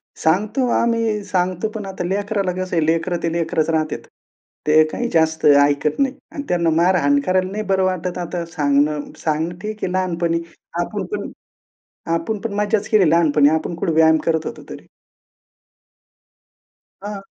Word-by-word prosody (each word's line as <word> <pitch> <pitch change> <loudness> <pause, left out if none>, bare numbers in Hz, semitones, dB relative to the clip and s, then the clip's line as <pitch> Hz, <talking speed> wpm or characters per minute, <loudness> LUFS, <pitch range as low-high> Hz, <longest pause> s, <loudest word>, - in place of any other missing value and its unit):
सांगतो 215 +10 +1
आम्ही, 230 -3 0
सांगतो 185 +1 -1
पण 210 -2 -4
आता 190 -2 -5
लेकराला 200 +1 -1
कसं 185 -1 -3
आहे. 160 -2 +2
लेकरं 165 +2 0
ते 165 - 0
लेकरच 165 -1 0
राहते. 155 -2 0 0.7
ते 155 +1 +6
काही 245 - -2
जास्त 160 -2 +1 0.2
ऐकत 145 - 0
नाही. 270 -1 +2 0.2
आणि 285 - -5
त्यांना 170 -2 +2
मारहाण 165 -5 +3
करायला 185 0 +1
नाही 215 +2 -3
बरं 190 -1 +1
वाटत. 180 -1 -2
आता 175 0 -4
सांगणं 145 -2 0
सांगणं 160 +2 -1
ठीक 215 +3 -6
आहे 180 - -1
लहानपणी. 170 -2 0 0.4
आपण 205 +4 -3
पण - - -5 0.8
आपण 165 +6 -1
पण 230 -1 -4
मज्जाच 210 0 0
केली 200 -7 +4
लहानपणी, 150 -3 +4
आपण 160 +2 -1
कुठे 165 - -1
व्यायाम 160 0 +5
करत 160 -1 0
होतो - - -6
तरी. - - -9 2.2
हां. 205 -1 -5
175 Hz, 150 wpm, -20 LUFS, 160-200 Hz, 2.2 s, ते